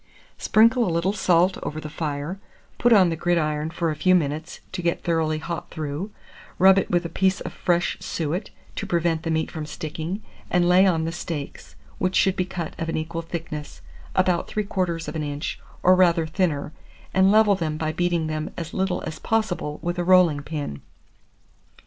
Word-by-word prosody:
Sprinkle 230 +3 +4
a 220 - 0
little 170 +4 +1
salt 185 -2 +3
over 155 - -4
the 155 - -6
fire, 150 +3 -4 0.4
put 240 - +4
on 195 -6 +7
the 165 - -1
gridiron 155 -2 0
for 165 0 -1
a - - -3
few 185 +4 +4
minutes, 155 -1 -1
to 185 - -4
get 170 0 -1
thoroughly 160 -2 +1
hot 170 +2 -5
through; 155 +5 -4 0.5
rub 190 +1 +7
it - - -3
with 175 0 +1
a - - 0
piece 190 +3 +1
of - - -6
fresh, 175 -1 0
suet, 170 +5 -3 0.3
to - - -3
prevent 170 -2 +1
the 165 - -4
meat 160 0 0
from 155 -2 -5
sticking, 160 +6 -5 0.3
and 175 -1 +3
lay 185 +2 +6
on 165 -3 +1
the 165 - -2
steaks, 165 - -6 0.2
which 185 0 0
should 190 -1 +3
be 185 - 0
cut 175 -3 -5
of 165 - -2
an - - -1
equal 160 +1 -3
thickness, 160 -3 -6 0.3
about 185 -2 +2
3/4 185 -6 -2
of 150 - -5
an 160 - -1
inch, 145 0 -4 0.2
or 185 - +7
rather 175 -3 +4
thinner, 155 -3 -1 0.4
and 190 +1 +5
level 215 -1 +5
them 160 -5 -2
by 155 -1 -1
beating 170 0 0
them 155 0 -3
as 165 -1 -5
little 190 -1 -1
as 160 - -6
possible 195 -9 -1
with 175 0 -2
a - - +1
rolling 175 -5 +5
pin. 145 - -5
170 Hz, 190 wpm, -24 LUFS, 155-185 Hz, 0.5 s, on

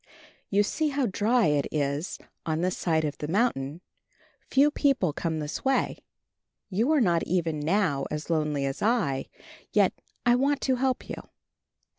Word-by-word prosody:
"You 205 +1 +3
see 310 +9 0
how 280 -2 0
dry 225 +3 +2
it 145 -2 +2
is 145 +3 -1 0.3
on 160 0 -1
this 185 +1 0
side 160 -2 +1
of 145 -1 -4
the 150 - -3
mountain. 170 - 0 0.7
Few 285 +3 +4
people 265 - +2
come 160 0 -2
this 150 -1 -4
way. 270 0 +1 0.7
You 225 +10 +2
are 305 -3 +4
not 175 -6 +3
even 165 -3 0
now 155 -3 +1
as 150 +1 -4
lonely 150 -4 0
as 135 0 -3
I, 195 - +1 0.5
yet - - +4 0.3
I 240 - +6
want 280 +2 +2
to 260 -2 +1
help 260 0 0
you. - - -7
180 Hz, 160 wpm, -27 LUFS, 150-245 Hz, 0.7 s, I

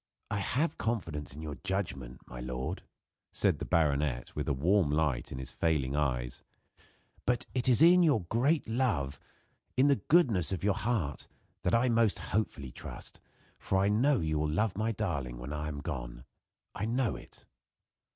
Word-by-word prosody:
"I 105 - 0
have 145 +10 0
confidence 80 - -3
in 80 - -8
your 75 -2 -6
judgment, 75 -11 -3
my - - -9
lord," 65 +1 -4 0.5
said - - +1
the - - -3
baronet, 70 -6 +1
with - - -2
a - - +3
warm 85 +5 +2
light 75 -4 0
in - - -5
his 65 - -6
failing 75 -5 0
eyes, 60 -5 -1 0.8
"but 125 -1 0
it 130 0 +1
is 125 +5 +7
in 180 +2 +8
your 150 - +4
great 130 - +1
love 110 - 0 0.6
in 135 +3 +5
the 140 - +4
goodness 120 - +4
of 95 - -3
your 100 0 +3
heart 100 - -2 0.3
that - - +2
I 120 +2 +3
most 115 -3 +3 0.2
hopefully 75 - -1
trust, - - -8 0.4
for 95 - 0
I 100 +1 +3
know 125 +4 +3
you 80 -1 0
will 75 0 0
love 100 +6 0
my 110 +3 0
darling 80 - -3
when 60 +5 -6
I 75 +1 -3
am 75 -2 -5
gone. - - -6 0.5
I 105 - -3
know 120 +1 0
it." - - -13
85 Hz, 170 wpm, -31 LUFS, 70-115 Hz, 0.8 s, in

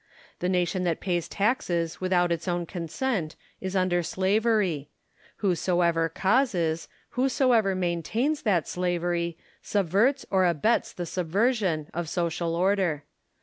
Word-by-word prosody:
The 180 - -1
nation 180 0 0
that 170 -2 0
pays 175 -3 -1
taxes 180 -7 -1
without 180 -1 +2
its 170 0 -2
own 175 -1 -1
consent 175 +1 -3 0.2
is 190 0 -4
under 185 -2 +2
slavery: 190 -4 +1 0.5
whosoever 175 -3 +1
causes, 185 - +1 0.2
whosoever 250 -6 +2
maintains 185 - -1
that 190 -8 +1
slavery, 175 -1 -1 0.2
subverts 205 - +1
or 190 -2 +4
abets 175 +8 +1
the 175 - -5
subversion 185 - 0
of 170 -1 -3
social 170 -1 -1
order. 180 -4 +1
180 Hz, 115 wpm, -27 LUFS, 170-205 Hz, 0.5 s, or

